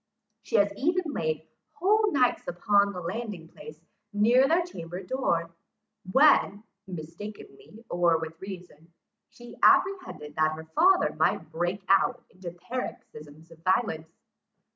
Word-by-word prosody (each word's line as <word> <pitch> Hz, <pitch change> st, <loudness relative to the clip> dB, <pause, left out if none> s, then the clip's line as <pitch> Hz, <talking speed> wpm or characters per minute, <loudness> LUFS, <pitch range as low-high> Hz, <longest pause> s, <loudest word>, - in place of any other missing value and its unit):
She -, -, -5 dB
has 200 Hz, -1 st, +3 dB
even 335 Hz, -, 0 dB
laid 155 Hz, -, -2 dB, 0.3 s
whole 410 Hz, +7 st, +2 dB
nights 255 Hz, -3 st, +1 dB
upon 200 Hz, +3 st, +2 dB
the 180 Hz, -2 st, -7 dB
landing 185 Hz, -2 st, -5 dB
place 155 Hz, -2 st, -12 dB, 0.3 s
near 235 Hz, +6 st, +4 dB
their 335 Hz, +4 st, +3 dB
chamber 175 Hz, -, -8 dB
door, 170 Hz, -8 st, -1 dB, 0.6 s
when, 240 Hz, -6 st, +4 dB, 0.2 s
mistakenly, 195 Hz, +6 st, -10 dB
or 175 Hz, -1 st, +2 dB
with 160 Hz, 0 st, -7 dB
reason, 180 Hz, -4 st, -10 dB, 0.4 s
she 240 Hz, 0 st, -13 dB
apprehended 365 Hz, -, +2 dB
that 155 Hz, 0 st, +2 dB
her 160 Hz, +1 st, -8 dB
father 370 Hz, -, +4 dB
might -, -, 0 dB
break 175 Hz, +4 st, -2 dB
out 195 Hz, +5 st, +2 dB
into 185 Hz, -1 st, -8 dB
paroxysms 170 Hz, -, -8 dB
of 165 Hz, -, -15 dB
violence. 185 Hz, -4 st, 0 dB
190 Hz, 125 wpm, -27 LUFS, 165-245 Hz, 0.6 s, near